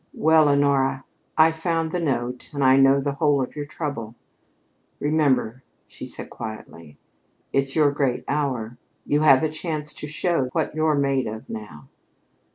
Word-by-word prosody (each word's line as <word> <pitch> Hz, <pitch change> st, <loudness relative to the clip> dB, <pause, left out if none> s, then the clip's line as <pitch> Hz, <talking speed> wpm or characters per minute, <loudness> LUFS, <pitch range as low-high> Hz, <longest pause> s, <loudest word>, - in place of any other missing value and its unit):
"Well, 160 Hz, -1 st, +4 dB
Honora, 140 Hz, -2 st, +2 dB, 0.3 s
I 160 Hz, +1 st, +6 dB
found 165 Hz, 0 st, -2 dB
the 180 Hz, -, -1 dB
note 125 Hz, -6 st, -2 dB
and 140 Hz, -, 0 dB
I 130 Hz, 0 st, +6 dB
know 135 Hz, 0 st, +5 dB
the 140 Hz, +1 st, -1 dB
whole 145 Hz, 0 st, +1 dB
of 130 Hz, -, -3 dB
your 145 Hz, -1 st, -5 dB
trouble. 130 Hz, -8 st, -5 dB, 0.8 s
Remember," 140 Hz, -5 st, +1 dB, 0.2 s
she -, -, -10 dB
said -, -, -7 dB
quietly, 85 Hz, -9 st, -9 dB, 0.6 s
"it's 135 Hz, 0 st, 0 dB
your 150 Hz, -3 st, +4 dB
great 140 Hz, -3 st, -1 dB
hour. 130 Hz, -6 st, -2 dB, 0.3 s
You 145 Hz, +1 st, +1 dB
have 135 Hz, -2 st, +6 dB
a -, -, +3 dB
chance 155 Hz, -1 st, -4 dB
to 150 Hz, -, -7 dB
show 155 Hz, -3 st, 0 dB
what 160 Hz, -, -1 dB
you're 155 Hz, -1 st, +1 dB
made 140 Hz, -3 st, +1 dB
of 110 Hz, +1 st, -7 dB
now." 85 Hz, -11 st, -9 dB
140 Hz, 160 wpm, -23 LUFS, 130-155 Hz, 0.8 s, I